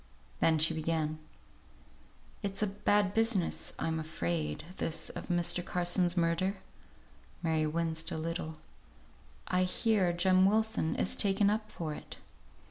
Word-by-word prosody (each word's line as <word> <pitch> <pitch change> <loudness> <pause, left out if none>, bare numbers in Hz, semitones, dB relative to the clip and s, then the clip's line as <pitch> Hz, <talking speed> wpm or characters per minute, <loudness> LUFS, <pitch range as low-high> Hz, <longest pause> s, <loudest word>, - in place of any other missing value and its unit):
Then 160 -1 +3
she 155 +2 +3
began: 155 -1 -1 1.2
"It's 195 +1 -1
a - - +4
bad 205 0 +1
business, 225 -5 +1
I'm 160 0 -1
afraid, 85 - -2
this 165 - -1
of - - -7
Mr. 175 0 +3
Carson's 175 0 +1
murder." 170 +3 +1 0.9
Mary 160 -2 +1
winced 160 0 -1
a - - -4
little. 160 0 -4 0.9
"I 180 0 +1
hear 185 0 +2
Jem 185 +2 +4
Wilson 220 -5 +1
is - - +1
taken 200 0 +2
up 215 0 -3
for 160 -3 -4
it." - - -9
175 Hz, 125 wpm, -31 LUFS, 160-195 Hz, 1.2 s, a